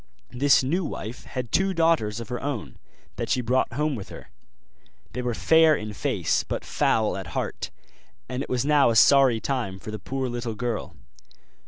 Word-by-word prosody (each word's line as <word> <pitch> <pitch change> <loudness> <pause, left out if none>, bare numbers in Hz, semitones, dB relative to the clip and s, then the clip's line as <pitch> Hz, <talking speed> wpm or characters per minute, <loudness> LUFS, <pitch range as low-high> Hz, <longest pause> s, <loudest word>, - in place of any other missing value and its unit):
This 130 0 +4
new 170 +8 0
wife 120 -5 -6
had 125 -3 -5
two 190 0 +2
daughters 160 -11 +2
of 115 - -8
her 125 - -4
own, 140 -6 -5 0.4
that - - -3
she - - +2
brought 125 0 0
home 150 +3 0
with 105 -7 -6
her; - - -11 0.8
they 125 - -3
were 120 -2 -2
fair 160 +4 +5
in 105 -3 -5
face - - 0
but - - -5
foul 110 -5 +1
at 95 -1 -6
heart, - - -3 0.6
and 125 - -3
it - - -6
was 125 +1 0
now 145 -3 +4
a 115 - +1
sorry 130 -1 +6
time 120 -7 -2
for 95 +3 -8
the 110 - -5
poor 130 +6 -3
little 120 -2 -4
girl. 120 0 -3
125 Hz, 185 wpm, -25 LUFS, 110-140 Hz, 0.8 s, sorry